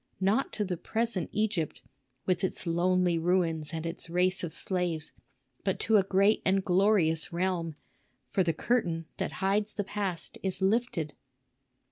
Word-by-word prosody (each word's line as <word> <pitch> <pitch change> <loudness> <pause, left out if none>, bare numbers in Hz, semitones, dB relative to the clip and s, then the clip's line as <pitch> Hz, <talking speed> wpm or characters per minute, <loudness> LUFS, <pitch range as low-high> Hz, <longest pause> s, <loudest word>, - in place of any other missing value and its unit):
Not 200 +8 +2
to 210 - -1
the 180 -2 -2
present 225 0 -1
Egypt, 205 -7 -1 0.4
with 185 0 +1
its 190 - -1
lonely 175 0 +2
ruins 165 -3 +1
and 165 0 -4
its 165 0 -4
race 180 +2 +1
of 170 - -3
slaves, 175 -5 -2 0.5
but - - 0
to 220 -1 +4
a 195 - +4
great 195 +3 +3
and 190 0 +2
glorious 180 -4 +3
realm; 170 -2 -1 0.5
for 195 - +1
the 170 -2 +2
curtain 170 -6 0
that - - -2
hides 205 +2 +1
the 205 - -1
past 190 -4 -4
is 190 -1 -2
lifted." 190 - 0
185 Hz, 150 wpm, -29 LUFS, 170-200 Hz, 0.5 s, to